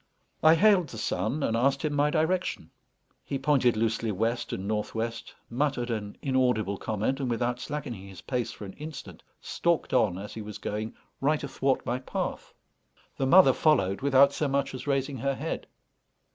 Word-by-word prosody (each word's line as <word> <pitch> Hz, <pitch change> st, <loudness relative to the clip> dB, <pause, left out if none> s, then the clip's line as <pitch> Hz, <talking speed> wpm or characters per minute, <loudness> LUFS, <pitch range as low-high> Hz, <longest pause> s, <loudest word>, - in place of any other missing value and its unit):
I 160 Hz, +1 st, +7 dB
hailed 195 Hz, -2 st, +4 dB
the 115 Hz, -, -8 dB
son, 125 Hz, +6 st, -1 dB
and 115 Hz, -, +1 dB
asked 135 Hz, +4 st, +1 dB
him 150 Hz, -, 0 dB
my 145 Hz, +1 st, +3 dB
direction. 170 Hz, +4 st, -1 dB, 0.5 s
He 140 Hz, -, -3 dB
pointed 135 Hz, -4 st, +2 dB
loosely 115 Hz, 0 st, 0 dB
west 115 Hz, +5 st, -1 dB
and 95 Hz, +1 st, -4 dB
north 105 Hz, +1 st, -2 dB
west, 115 Hz, +1 st, -4 dB
muttered 125 Hz, -1 st, -1 dB
an 105 Hz, -2 st, -4 dB
inaudible 125 Hz, -7 st, +1 dB
comment, 110 Hz, +8 st, -1 dB
and, 135 Hz, -3 st, -1 dB
without 120 Hz, +1 st, -1 dB
slackening 125 Hz, -11 st, -5 dB
his 95 Hz, -2 st, -11 dB
pace 125 Hz, -3 st, -2 dB
for 105 Hz, -, -9 dB
an 95 Hz, -, -8 dB
instant, 140 Hz, -, -8 dB, 0.2 s
stalked 170 Hz, -2 st, 0 dB
on, 105 Hz, -8 st, +3 dB
as 100 Hz, +2 st, -7 dB
he 110 Hz, -, -6 dB
was 105 Hz, -1 st, -7 dB
going, 105 Hz, +2 st, -4 dB, 0.3 s
right 150 Hz, +2 st, +1 dB
athwart 135 Hz, -1 st, 0 dB
my 125 Hz, +2 st, -1 dB
path. 130 Hz, -, -4 dB, 0.7 s
The 135 Hz, -, 0 dB
mother 185 Hz, +6 st, +7 dB
followed 100 Hz, -12 st, +2 dB
without 140 Hz, 0 st, +5 dB
so 150 Hz, -, 0 dB
much 140 Hz, 0 st, 0 dB
as 130 Hz, +2 st, -7 dB
raising 135 Hz, -1 st, 0 dB
her 135 Hz, +3 st, -1 dB
head. -, -, -4 dB
130 Hz, 175 wpm, -28 LUFS, 110-145 Hz, 0.7 s, I